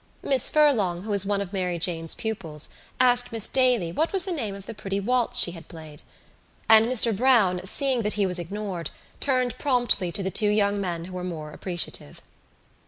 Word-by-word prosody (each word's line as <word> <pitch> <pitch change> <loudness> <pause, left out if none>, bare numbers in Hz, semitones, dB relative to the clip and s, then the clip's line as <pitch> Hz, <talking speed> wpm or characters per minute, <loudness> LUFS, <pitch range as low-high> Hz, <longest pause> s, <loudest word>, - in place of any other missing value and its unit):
Miss 265 -2 +3
Furlong, 215 - +1
who 215 - -6
was 200 -1 0
one 200 -1 0
of 200 0 -7
Mary 180 -2 -2
Jane's 165 -2 -3
pupils, 170 -9 -4 0.3
asked 245 -1 +4
Miss 225 -2 +6
Daly 250 -10 +1
what 315 - -2
was 385 -2 +6
the 380 - -4
name 225 - -4
of 195 -1 -12
the - - -8
pretty 200 -2 -5
waltz 245 +3 -1
she 175 - +6
had 165 -2 -12
played; 155 -3 -13 0.7
and 220 0 +6
Mr 235 -3 +4
Browne, 210 -6 +2
seeing 260 +4 0
that 210 -1 0
he 205 -1 0
was 180 -1 +1
ignored, 185 -1 -6 0.3
turned 255 -3 -1
promptly 245 - 0
to 200 +2 -5
the 190 - -3
two 210 +1 +1
young 205 -1 0
men 170 -3 -4
who 185 - -11
were 180 0 -6
more 160 -4 -7
appreciative. 175 - -3
200 Hz, 195 wpm, -24 LUFS, 180-245 Hz, 0.7 s, Miss